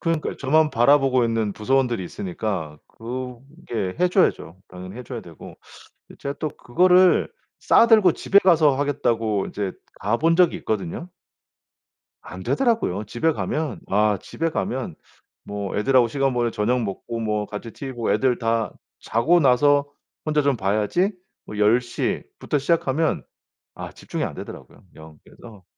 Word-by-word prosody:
그러니까 165 Hz, -2 st, -1 dB
저만 155 Hz, +3 st, +2 dB
바라보고 130 Hz, +1 st, +4 dB
있는 115 Hz, -3 st, 0 dB
부서원들이 120 Hz, -1 st, 0 dB
있으니까 105 Hz, -, -4 dB
그게 125 Hz, -, -6 dB
해 180 Hz, -, +4 dB
줘야죠, 175 Hz, -, +1 dB
당연히 90 Hz, +3 st, -10 dB
해 125 Hz, -, -8 dB
줘야 120 Hz, -3 st, -6 dB
되고. 85 Hz, -2 st, -12 dB, 0.5 s
근데 -, -, -15 dB
제가 140 Hz, 0 st, -4 dB
또 155 Hz, -, -2 dB
그거를 180 Hz, +8 st, +3 dB, 0.3 s
싸 230 Hz, -, +4 dB
들고 215 Hz, -4 st, +6 dB
집에 200 Hz, -, +3 dB
가서 160 Hz, -7 st, +4 dB
하겠다고 115 Hz, -8 st, 0 dB
인제 100 Hz, -2 st, -4 dB, 0.3 s
가 105 Hz, +4 st, +1 dB
본 165 Hz, +1 st, +2 dB
적이 180 Hz, -2 st, +4 dB
있거든요. 105 Hz, -, -4 dB, 1.1 s
안 90 Hz, +1 st, -9 dB
되더라고요. 225 Hz, -, 0 dB
집에 120 Hz, +10 st, 0 dB
가면 150 Hz, -5 st, -3 dB
아 105 Hz, +1 st, +2 dB
집에 165 Hz, -, -3 dB
가면 125 Hz, -, -3 dB, 0.5 s
뭐 100 Hz, -1 st, -5 dB
애들하고 120 Hz, +2 st, +3 dB
시간 135 Hz, +2 st, 0 dB
보내고 120 Hz, -1 st, 0 dB
저녁 120 Hz, +3 st, 0 dB
먹고 115 Hz, +3 st, -5 dB
뭐 105 Hz, -2 st, -1 dB
같이 105 Hz, +3 st, -7 dB
티브이 135 Hz, -2 st, -7 dB
보고 120 Hz, -1 st, -1 dB
애들 130 Hz, -2 st, +1 dB
다 115 Hz, -2 st, -1 dB, 0.3 s
자고 155 Hz, +11 st, +2 dB
나서 145 Hz, +1 st, +4 dB, 0.4 s
혼자 150 Hz, -1 st, +1 dB
좀 140 Hz, -2 st, +1 dB
봐야지 105 Hz, -, 0 dB, 0.3 s
뭐 105 Hz, -, -9 dB
10 110 Hz, +4 st, +4 dB
시부터 125 Hz, +4 st, -3 dB
시작하면 155 Hz, 0 st, 0 dB, 0.5 s
아 -, -, -8 dB
집중이 -, -, -5 dB
안 -, -, -3 dB
되더라고요, -, -, -10 dB
영. 80 Hz, -1 st, -13 dB
그래서 105 Hz, -6 st, -15 dB
125 Hz, 315 characters per minute, -23 LUFS, 105-150 Hz, 1.1 s, 들고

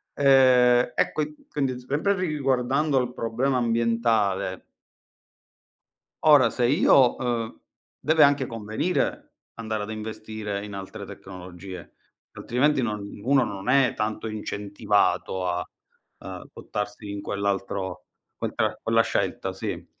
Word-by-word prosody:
Ehm, 125 Hz, -3 st, +5 dB
e -, -, +2 dB
qui 150 Hz, 0 st, -2 dB
quindi 135 Hz, -3 st, -1 dB
sempre 150 Hz, +10 st, 0 dB
ri 185 Hz, -1 st, -1 dB
riguardando 140 Hz, 0 st, +1 dB
il 125 Hz, -1 st, -2 dB
problema 125 Hz, +4 st, 0 dB
ambientale 115 Hz, -5 st, +1 dB, 1.6 s
ora 145 Hz, -7 st, +6 dB
se 120 Hz, +1 st, +1 dB
io, 130 Hz, -1 st, +5 dB
uhm 115 Hz, -2 st, -3 dB, 0.4 s
deve 160 Hz, 0 st, +4 dB
anche 140 Hz, -1 st, +5 dB
convenire 115 Hz, -, -2 dB, 0.2 s
andare 110 Hz, -2 st, -3 dB
ad 105 Hz, -, -7 dB
investire 110 Hz, -1 st, -5 dB
in 105 Hz, -1 st, -8 dB
altre 95 Hz, -1 st, -7 dB
tecnologie, 90 Hz, -1 st, -10 dB, 0.4 s
altrimenti 135 Hz, +3 st, +1 dB
non 105 Hz, -3 st, -2 dB, 0.2 s
uno 135 Hz, +2 st, +3 dB
non 100 Hz, +2 st, -3 dB
è 135 Hz, -2 st, +4 dB
tanto 110 Hz, 0 st, -3 dB
incentivato 100 Hz, -3 st, -1 dB
a, 90 Hz, 0 st, -2 dB, 0.5 s
uhm, -, -, -8 dB
buttarsi 105 Hz, 0 st, -5 dB
in 100 Hz, 0 st, -5 dB
quell'altro 100 Hz, -2 st, -3 dB, 0.3 s
quel -, -, -3 dB
tra -, -, 0 dB
quella -, -, +3 dB
scelta, -, -, -2 dB
sì. -, -, -5 dB
115 Hz, 120 wpm, -25 LUFS, 105-135 Hz, 1.6 s, ora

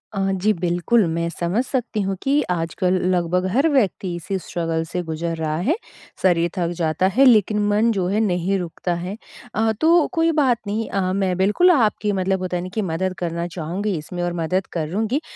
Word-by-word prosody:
अ, -, -, -1 dB
जी, 190 Hz, +3 st, +1 dB
बिल्कुल 180 Hz, +5 st, +1 dB
मैं 170 Hz, 0 st, -1 dB
समझ 175 Hz, +8 st, -1 dB
सकती 245 Hz, -5 st, -2 dB
हूँ 195 Hz, 0 st, -1 dB
कि 280 Hz, +2 st, +2 dB
आजकल 175 Hz, +2 st, 0 dB, 0.2 s
लगभग 180 Hz, +1 st, 0 dB
हर 275 Hz, +6 st, +3 dB
व्यक्ति 200 Hz, -, +1 dB
इसी 185 Hz, +3 st, -3 dB
स्ट्रगल 165 Hz, -2 st, -2 dB
से 180 Hz, -, -1 dB
गुज़र 165 Hz, +1 st, -3 dB
रहा 155 Hz, -1 st, -2 dB
है 320 Hz, -, +3 dB, 0.5 s
शरीर 175 Hz, -2 st, +3 dB
थक 175 Hz, -2 st, +1 dB
जाता 165 Hz, +2 st, +1 dB
है, 275 Hz, -, +6 dB
लेकिन 215 Hz, -4 st, +4 dB
मन 215 Hz, +3 st, +3 dB
जो 190 Hz, -5 st, -1 dB
है 205 Hz, +3 st, +1 dB
नहीं 195 Hz, -2 st, +1 dB
रुकता 175 Hz, +1 st, -3 dB
है। 180 Hz, +5 st, -5 dB, 0.4 s
अ, 220 Hz, +1 st, +2 dB
तो 335 Hz, 0 st, +5 dB
कोई 330 Hz, -1 st, +2 dB
बात 270 Hz, -6 st, +2 dB
नहीं 215 Hz, +2 st, -2 dB
अ, 185 Hz, -2 st, 0 dB
मैं 190 Hz, -2 st, 0 dB
बिल्कुल 210 Hz, -, +4 dB
आपकी 220 Hz, -7 st, +2 dB
मतलब 190 Hz, -1 st, 0 dB
होता 180 Hz, -1 st, -2 dB
हैं -, -, -3 dB
ना, 185 Hz, -, -6 dB
कि 220 Hz, -, -1 dB
मदद 185 Hz, +1 st, -2 dB
करना 170 Hz, 0 st, -2 dB
चाहूँगी 180 Hz, +5 st, -3 dB
इसमें 175 Hz, +4 st, -6 dB
और 175 Hz, -, -1 dB
मदद 175 Hz, +3 st, -1 dB
करूँगी। 210 Hz, -, -1 dB
185 Hz, 195 wpm, -21 LUFS, 175-215 Hz, 0.5 s, है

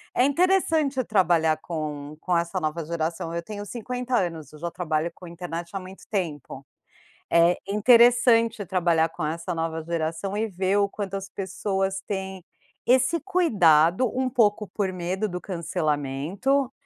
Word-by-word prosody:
É 250 Hz, -, +4 dB
interessante 315 Hz, -3 st, +2 dB
trabalhar 170 Hz, -7 st, +2 dB
com 150 Hz, -2 st, -5 dB
com 180 Hz, -1 st, -1 dB
essa 170 Hz, 0 st, -1 dB
nova 155 Hz, +1 st, -2 dB
geração. 165 Hz, 0 st, -3 dB
Eu 170 Hz, -, -2 dB
tenho 205 Hz, +1 st, -7 dB
50 250 Hz, +3 st, -3 dB
anos, 165 Hz, -4 st, -3 dB
eu 150 Hz, -, -13 dB
já 170 Hz, +1 st, -3 dB
trabalho 165 Hz, -1 st, -1 dB
com 180 Hz, -, -12 dB
internet 170 Hz, 0 st, -6 dB
há 195 Hz, -, -1 dB
muito 185 Hz, +1 st, -11 dB
tempo, 150 Hz, -8 st, -4 dB, 0.7 s
é 170 Hz, +1 st, +5 dB
interessante 230 Hz, 0 st, +5 dB
trabalhar 170 Hz, -3 st, +2 dB
com 155 Hz, -, -5 dB
essa 165 Hz, +3 st, -3 dB
nova 165 Hz, 0 st, -2 dB
geração 165 Hz, +4 st, -2 dB
e 220 Hz, +1 st, 0 dB
ver 190 Hz, +1 st, 0 dB
o 200 Hz, -1 st, +3 dB
quanto 200 Hz, -1 st, -5 dB
as 195 Hz, 0 st, -4 dB
pessoas 195 Hz, 0 st, -2 dB
têm 190 Hz, -2 st, -4 dB, 0.4 s
esse 260 Hz, +6 st, +3 dB
cuidado, 210 Hz, -, +3 dB
um 260 Hz, -, +1 dB
pouco 210 Hz, -4 st, +2 dB
por 195 Hz, -3 st, -1 dB
medo 185 Hz, +4 st, -2 dB
do 180 Hz, -1 st, -5 dB
cancelamento, 170 Hz, -, -1 dB
185 Hz, 150 wpm, -25 LUFS, 165-220 Hz, 0.7 s, é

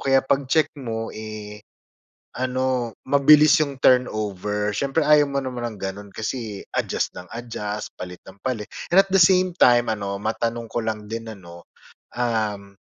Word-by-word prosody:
kaya 135 Hz, 0 st, +3 dB
'pag-check 140 Hz, +3 st, +1 dB
mo, 115 Hz, -2 st, -4 dB
eh, 105 Hz, -1 st, -8 dB, 0.8 s
ano, 130 Hz, -2 st, -1 dB, 0.2 s
mabilis 150 Hz, +2 st, +6 dB
'yong 140 Hz, -3 st, -2 dB
turnover. 105 Hz, -4 st, +1 dB
Siyempre 140 Hz, +9 st, 0 dB
ayaw 150 Hz, 0 st, +5 dB
mo 140 Hz, -1 st, -2 dB
naman 125 Hz, -2 st, -4 dB
ng -, -, -14 dB
gano'n, 100 Hz, +1 st, -5 dB
kasi 110 Hz, -2 st, -4 dB, 0.2 s
adjust -, -, -1 dB
nang 90 Hz, -, -10 dB
adjust, 105 Hz, -3 st, -5 dB
palit 90 Hz, -1 st, -8 dB
nang 95 Hz, +1 st, -15 dB
palit, 115 Hz, -3 st, -4 dB, 0.2 s
and 195 Hz, -, +8 dB
at 195 Hz, -, -17 dB
the 195 Hz, -, +4 dB
same 185 Hz, +1 st, +5 dB
time, 120 Hz, -2 st, +5 dB
ano 100 Hz, -2 st, -3 dB
matanong 115 Hz, +1 st, -2 dB
ko -, -, -2 dB
lang 110 Hz, -2 st, -4 dB
din, 115 Hz, 0 st, -5 dB
ano, 85 Hz, -6 st, -11 dB, 0.5 s
um, 110 Hz, -4 st, -1 dB
115 Hz, 155 wpm, -23 LUFS, 105-135 Hz, 0.8 s, and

